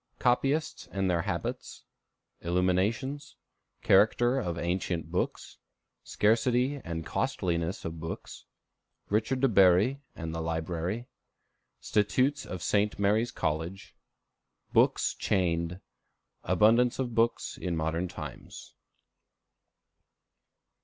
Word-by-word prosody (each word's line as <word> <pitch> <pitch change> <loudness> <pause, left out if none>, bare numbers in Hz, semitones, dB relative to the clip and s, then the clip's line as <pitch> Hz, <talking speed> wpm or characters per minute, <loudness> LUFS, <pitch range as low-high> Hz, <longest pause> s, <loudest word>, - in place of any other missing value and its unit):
Copyists 135 +5 0
and 95 -1 -1
their 85 -1 +1
Habits. - - -4 0.6
Illuminations. 95 - 0 0.5
Character 120 +6 +4
of 85 -8 -3
Ancient 85 -2 -2
Books. 90 - -3 0.4
Scarcity 125 +5 +1
and 80 -1 -5
Costliness 85 0 -2
of 80 0 -5
Books. 80 +1 -7 0.6
Richard 110 +5 0
de 135 - +5
Bury 100 +5 +4
and 80 0 -5
Library. 85 +6 -3 0.8
Statutes 130 +7 +1
of 90 -1 -6
St. 105 0 +1
Mary's 105 +4 +2
College. 80 +5 -3 0.8
Books - - +3
Chained. 85 -1 0 0.6
Abundance 110 +7 +4
of 125 -3 -2
Books 115 +1 0
in 90 -2 -2
Modern 80 +3 -1
Times. - - -9
95 Hz, 90 wpm, -29 LUFS, 85-120 Hz, 0.8 s, de